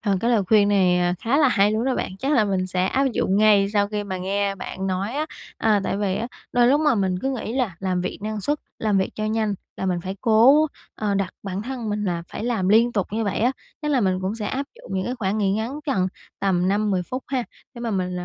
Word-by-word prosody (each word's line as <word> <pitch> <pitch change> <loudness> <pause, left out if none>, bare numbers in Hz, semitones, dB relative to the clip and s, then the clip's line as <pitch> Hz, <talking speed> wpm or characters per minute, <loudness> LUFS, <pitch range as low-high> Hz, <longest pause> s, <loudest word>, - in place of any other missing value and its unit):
ờ, 200 -3 +1
cái 235 - +1
lời 225 -4 +3
khuyên 205 +1 +4
này, 185 -3 +3
ờ, 175 0 +1
khá 240 +5 +2
là 290 -4 +5
hay 205 -2 +3
luôn 220 +3 0
đó 265 - +1
bạn, 185 - -3
chắc 275 +6 0
là 245 -7 +4
mình 190 -2 0
sẽ 185 0 0
áp 270 +7 +1
dụng 195 -1 +1
ngay 210 -2 +5
sau 205 -1 +2
khi 210 0 -3
mà 190 -2 -4
nghe 195 +2 -1
bạn 190 0 -5
nói 190 +4 -1
á, 305 +2 -1 0.3
ờ, 215 -2 +3
tại - - -1
vì 200 -2 0
á, 230 - -2 0.3
đôi 245 -1 +4
lúc 285 +3 +4
mà 300 -3 +3
mình 190 -4 0
cứ 265 +8 -1
nghĩ 245 -4 -4
là 245 -8 -1
làm 185 -2 0
việc 180 - -4
năng 215 0 -3
suất, 295 +8 0 0.2
làm 210 -3 +1
việc 190 - 0
cho 215 - -3
nhanh 215 -1 0 0.2
là 190 - -3
mình 180 -2 0
phải 190 +3 -5
cố, 245 +8 +6 0.3
ờ, 210 -2 -1
đặt 195 -2 -1
bản 195 0 -4
thân 245 -2 -5
mình 210 0 -1
là 175 -3 -1
phải - - -4
làm 225 -6 0
liên 230 +4 +5
tục 200 -4 0
như 225 0 0
vậy 200 - -1
á. 245 +4 +3 0.3
Chắc 300 - -1
là 270 -3 +3
mình 185 -3 +1
cũng 190 +3 -2
sẽ 215 -2 -4
áp 275 +6 -2
dụng - - -10
những 190 0 -1
cái 245 - -2
khoảng 210 -3 -1
nghĩ 195 -2 +2
ngắn 230 +8 -3
gần 190 -9 +1 0.3
tầm 185 -2 +2
5-10 200 -2 +1
phút 255 +8 -5
ha, 260 -3 -1 0.3
để 235 - -9
mà 235 -1 -2
mình, 185 -3 -1
ờ, 180 - -4
205 Hz, 275 wpm, -23 LUFS, 190-235 Hz, 0.3 s, cố